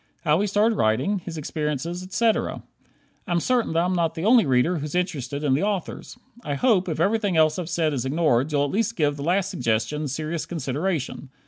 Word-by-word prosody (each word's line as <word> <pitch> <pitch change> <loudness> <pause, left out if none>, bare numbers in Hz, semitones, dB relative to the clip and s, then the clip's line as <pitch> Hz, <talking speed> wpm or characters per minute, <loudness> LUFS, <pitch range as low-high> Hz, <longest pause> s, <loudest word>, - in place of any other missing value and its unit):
How 155 +5 +3
he 205 - +1
started 210 +2 +2
writing, 110 - +1
his 170 -2 -8
experiences, 155 +3 -3
etc. 220 +4 0 0.6
I'm 175 -1 +1
certain 240 -1 0
that 165 +1 +2
I'm 180 - 0
not 165 -2 0
the 165 +2 -3
only 230 - +5
reader 135 +7 +2
who's 150 +2 -5
interested 150 -6 -2
in 140 -3 +2
the 140 - +1
authors. 205 +2 -3 0.3
I 145 - -2
hope, 190 - +2
if 155 - -3
everything 200 0 +1
else 155 +1 +3
I've 175 -2 -4
said 160 -4 0
is 130 -4 -2
ignored, 140 -1 +1
you'll 145 -1 +2
at 145 - -4
least 230 +2 0
give 145 -3 +1
the 145 - -8
last 185 +4 +1
suggestion 145 - -1
serious 155 +4 -3
consideration. 150 -2 -3
165 Hz, 200 wpm, -24 LUFS, 145-190 Hz, 0.6 s, only